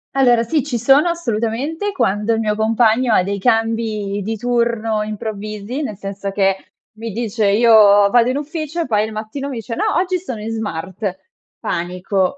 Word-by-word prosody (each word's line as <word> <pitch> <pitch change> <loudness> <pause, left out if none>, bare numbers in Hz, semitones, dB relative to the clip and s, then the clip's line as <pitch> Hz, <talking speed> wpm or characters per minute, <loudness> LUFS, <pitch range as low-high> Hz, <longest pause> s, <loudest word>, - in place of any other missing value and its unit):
Allora 245 -4 +4
sì 300 +6 0
ci 275 -5 -2
sono 270 +8 +4
assolutamente 285 - -2
quando 225 - 0
il 225 - 0
mio 210 -1 0
compagno 225 +2 +2
ha - - +4
dei 200 +2 -3
cambi 225 -2 0
di 220 +3 -3
turno 235 -2 0
improvvisi, 215 +3 -5
nel 215 -9 -4
senso 200 0 -5
che 195 -1 +2 0.4
mi 225 0 -5
dice: 220 0 -1
"Io 230 +4 +4 0.4
vado 240 0 +4
in 255 - -1
ufficio." 310 +2 -4
E - - -1
poi 215 -3 +1
il 220 - -7
mattino 220 +6 -5
mi 270 - -5
dice: 230 0 -6
"No 325 - -1
oggi 365 0 0
sono 255 -11 -6
in 215 +2 -5
smart." 190 -2 -4 0.4
Panico: 180 +5 -1
225 Hz, 175 wpm, -18 LUFS, 210-250 Hz, 0.4 s, Allora